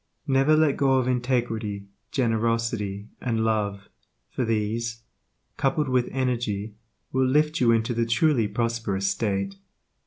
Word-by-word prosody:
Never 135 +3 +4
let 155 -3 +3
go 135 -1 +3
of 130 -1 +2
integrity, 120 -5 -1 0.3
generosity, 115 -4 -1
and 115 -3 0
love, 100 -3 -1 0.4
for 130 - -1
these, 115 +1 -1 0.5
coupled 140 +1 +1
with 125 -1 +1
energy, 115 -5 -1 0.4
will 130 0 +2
lift 150 +3 +2
you 120 -2 +5
into 115 +1 +1
the 115 0 0
truly 115 -1 +3
prosperous 115 -3 -1
state. 100 -2 -1
115 Hz, 125 wpm, -25 LUFS, 105-130 Hz, 0.5 s, you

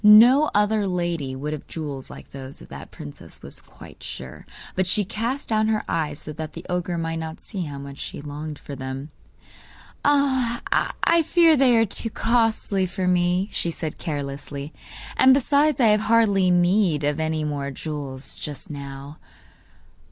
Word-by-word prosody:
No 240 +8 +8
other 210 0 +3
lady 170 -7 -1
would 150 +3 -3
have 150 - -7
jewels 145 -5 -5
like - - -11
those 135 0 -8
of - - -14
that - - -9
the - - -20
princess 75 - -9
was - - -8
quite - - -15
sure; 65 0 -7 0.3
but 185 -1 0
she 205 +2 +2
cast 235 +8 -3
down 215 -1 +2
her 220 -1 +1
eyes 150 -3 -1
so 155 - -7
that 155 0 -6
the 170 - -9
ogre 180 -1 -1
might 165 0 -2
not 160 0 -6
see 190 -5 -5
how 145 -2 -6
much 140 0 -9
she - - -6
longed 150 +1 -6
for 140 - -8
them. 135 +2 -6 0.9
'I 280 +3 +2
fear 330 0 +5
they 255 -4 +5
are 225 - +5
too 225 +2 -3
costly 225 -4 +1
for 185 0 -2
me,' 180 +1 +2
she 170 - -1
said 160 -2 -5
carelessly; 145 -1 -5 0.4
'and 260 0 +7
besides, 285 +1 +3
I 235 -4 +6
have 210 0 +4
hardly 210 -5 +4
need 175 -3 +3
of 145 +1 0
any 160 0 0
more 145 -2 -2
jewels 140 -2 -5
just 150 +1 -6
now. 140 +1 -8
175 Hz, 170 wpm, -24 LUFS, 145-220 Hz, 0.9 s, No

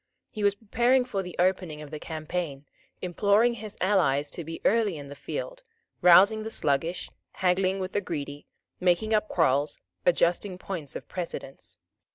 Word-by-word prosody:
He 215 - -4
was 200 -1 +4
preparing 240 +4 +2
for 200 -6 -2
the 180 -2 -8
opening 180 -4 +1
of 150 -1 -9
the 155 - -5
campaign, 155 -3 -4 0.4
imploring 205 +6 +3
his 215 -2 -7
allies 150 -8 +2
to 170 - -5
be 165 +1 -7
early 215 -5 +3
in 140 -1 -9
the 140 - -8
field, - - -5 0.4
rousing 195 +5 +7
the 220 - -4
sluggish, 165 -2 -1 0.2
haggling 185 +1 +1
with 185 0 -3
the 205 - 0
greedy, 145 -5 -5 0.3
making 180 +5 +2
up 215 0 +2
quarrels, 145 -3 +2 0.3
adjusting 180 +2 +2
points 170 -7 -6
of - - -7
precedence. 170 -6 -7
180 Hz, 160 wpm, -27 LUFS, 155-205 Hz, 0.4 s, rousing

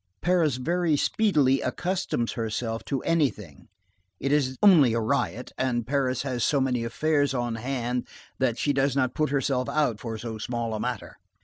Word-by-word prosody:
Paris 170 -6 +2
very 165 +4 0
speedily 145 -10 +2
accustoms 180 -10 -2
herself 115 0 -3
to 130 +3 -3
anything,—it 105 - -3
is 135 -3 +1
only 160 - +7
a - - +1
riot,—and 120 +2 -1
Paris 130 -1 0
has 125 -4 -2
so 145 - +2
many 125 -3 0
affairs 145 +3 0
on 120 -2 -1
hand, 125 +1 -3 0.3
that 125 -3 +1
she 145 +4 +1
does 135 0 +1
not 130 -2 +1
put 155 -1 0
herself 135 -2 0
out 145 -8 0
for 115 -2 -5
so 110 -1 -6
small 115 0 -3
a 110 - -3
matter. - - -4
130 Hz, 155 wpm, -26 LUFS, 115-145 Hz, 0.3 s, only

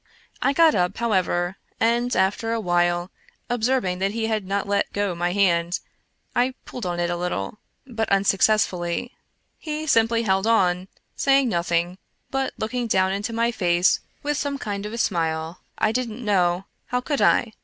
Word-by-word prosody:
I - - +3
got 320 +2 +5
up, 180 -1 0
however, 185 -5 0 0.2
and 240 +2 +2
after 210 +4 +1
a 230 - 0
while, 175 -2 +1 0.4
observing 235 -6 0
that 195 +1 0
he 225 0 -1
had 215 -3 -1
not 200 +1 -1
let 200 0 0
go 205 -2 0
my 175 +1 -1
hand, 175 -3 +2 0.6
I 255 +1 +2
pulled 240 -7 -6
on 175 -1 -2
it 175 0 0
a - - 0
little, 175 - -3 0.3
but 225 -4 -3
unsuccess 200 +2 +4
fully. 175 +6 -4 0.5
He 310 0 -4
simply 230 -4 +3
held 190 0 +1
on, 185 -5 +2 0.3
saying 275 -2 +3
nothing, 170 0 0 0.3
but 270 0 -1
looking 240 +2 -2
down 190 -3 +2
into 200 +4 -2
my 230 +1 +1
face 180 -4 +2 0.2
with 295 0 0
some 285 -1 -2
kind 205 -4 -4
of 210 - -8
a - - -4
smile 165 -5 -1
— - - -45
I 215 - +2
didn't 240 -1 -3
know 180 -2 +2
— - - -47
how 250 - 0
could 285 +2 -1
I 225 -2 +3
205 Hz, 175 wpm, -23 LUFS, 180-235 Hz, 0.6 s, got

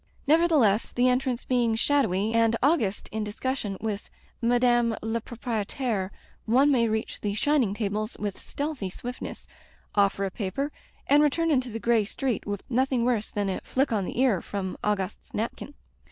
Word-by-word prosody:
Nevertheless, 295 - +4
the 245 +1 +2
entrance 255 -1 +1
being 240 -3 +2
shadowy, 225 -5 +1
and 230 0 +3
Auguste 260 - +2
in 220 0 -2
discussion 210 -1 -3
with 210 -2 -4 0.3
Madame 240 -1 +3
la 225 +1 -1
Proprietaire, 225 -2 -2 0.4
one 265 +6 +5
may 235 -4 +3
reach 220 0 -2
the 205 -1 -1
shining 250 -5 +2
tables 215 +1 -2
with 205 -2 -4
stealthy 285 -9 -3
swiftness, 245 +6 -7 0.5
offer 200 -1 +2
a 190 - -3
paper, 225 +10 -3 0.3
and 290 +1 +5
return 325 +3 +2
into 255 -3 +1
the 225 - -4
gray 230 0 +3
street 240 +3 -2
with 205 -1 -3
nothing 255 -1 +1
worse 235 -4 +1
than 205 -1 -2
a 190 - -2
flick 270 +1 0
on 205 -4 +1
die - - -4
ear 245 -7 +3
from 190 -2 -4
Augustc's 205 -2 -2
napkin. 235 +6 -4
230 Hz, 160 wpm, -27 LUFS, 205-260 Hz, 0.5 s, one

